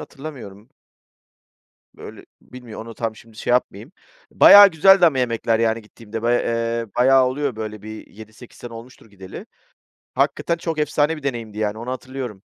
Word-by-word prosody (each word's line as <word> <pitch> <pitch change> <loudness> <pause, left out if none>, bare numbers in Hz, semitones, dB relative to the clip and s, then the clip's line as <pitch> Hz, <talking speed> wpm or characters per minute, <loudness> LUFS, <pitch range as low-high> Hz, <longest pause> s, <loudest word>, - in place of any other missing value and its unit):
hatırlamıyorum. 125 -7 -11 1.3
Böyle - - -12 0.2
bilmiyor, 125 -4 -11
onu 115 0 -10
tam; 115 -2 -4
şimdi 110 0 -18
şey 120 - -3
yapmayayım. 120 - -2 0.4
Bayağı 205 0 +9
güzeldi 190 +3 +5
ama 140 -6 +2
yemekler, 115 -2 -1
yani, 115 0 0
gittiğimde 110 +1 -10
bay, 120 +1 +1
eee, 115 0 -2
bayağı 130 +1 +4
oluyor 130 -1 -3
böyle 110 -1 -7
bir 110 +1 -10
7-8 110 +3 -15
sene 120 -1 -10
olmuştur 115 -1 -13
gideli. 95 -2 -11 0.7
Hakikaten 145 +5 -1
çok 165 -2 -4
efsane 150 +1 0
bir 145 - -13
deneyimdi, 115 -6 -5
yani, 105 0 -2
onu 120 +3 -6
hatırlıyorum. 130 -6 -7
115 Hz, 155 wpm, -20 LUFS, 110-135 Hz, 1.3 s, Bayağı